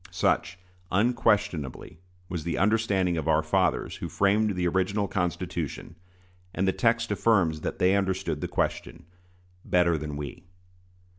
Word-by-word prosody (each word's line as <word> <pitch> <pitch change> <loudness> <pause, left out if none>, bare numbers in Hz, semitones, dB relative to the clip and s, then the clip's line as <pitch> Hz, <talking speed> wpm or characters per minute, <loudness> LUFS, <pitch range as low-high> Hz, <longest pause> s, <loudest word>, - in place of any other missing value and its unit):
Such, 90 0 0 0.3
unquestionably, 100 - 0 0.3
was 85 -4 -4
the 85 +1 -2
understanding 100 -4 +2
of 80 -1 -3
our 80 -1 +3
fathers 90 +3 0
who - - -5
framed 100 +1 +2
the 90 -1 0
original 95 +3 0
Constitution; 90 -2 -3 0.6
and 95 +1 0
the - - +4
text 115 -1 +1
affirms 95 -7 +2
that - - -4
they 95 +2 +3
understood 95 -5 -1
the - - -2
question - - -3 0.6
"better 85 -3 +2
than 75 -1 -5
we." 75 +5 -7
90 Hz, 135 wpm, -27 LUFS, 85-100 Hz, 0.6 s, the